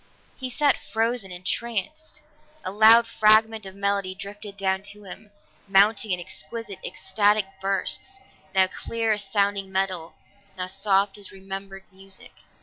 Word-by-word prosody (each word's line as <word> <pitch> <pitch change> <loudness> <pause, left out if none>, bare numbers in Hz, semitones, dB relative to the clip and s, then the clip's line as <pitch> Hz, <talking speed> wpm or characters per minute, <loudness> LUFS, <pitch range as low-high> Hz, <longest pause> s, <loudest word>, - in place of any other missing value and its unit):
He 260 -1 -5
sat 285 +3 +2
frozen, 225 -3 -1
entranced. 235 - -3 0.4
A 185 - -3
louder 225 +3 +7
fragment 220 -1 +4
of 190 - -10
melody 200 -1 0
drifted 200 +1 -9
down 190 -1 0
to 210 0 -10
him, 205 +2 -10 0.4
mounting 200 +2 +4
in 180 -2 0
exquisite, 220 +3 -5
ecstatic 205 +2 +1 0.2
bursts, 195 - -1 0.4
now 190 0 +6
clear 225 +4 -2
as 210 -1 0
sounding 200 -1 0
metal, 185 -3 -1 0.4
now 180 - -2
soft 195 +1 +1
as 200 - -5
remembered 195 0 -8
music. 190 0 -9
200 Hz, 135 wpm, -25 LUFS, 190-220 Hz, 0.4 s, louder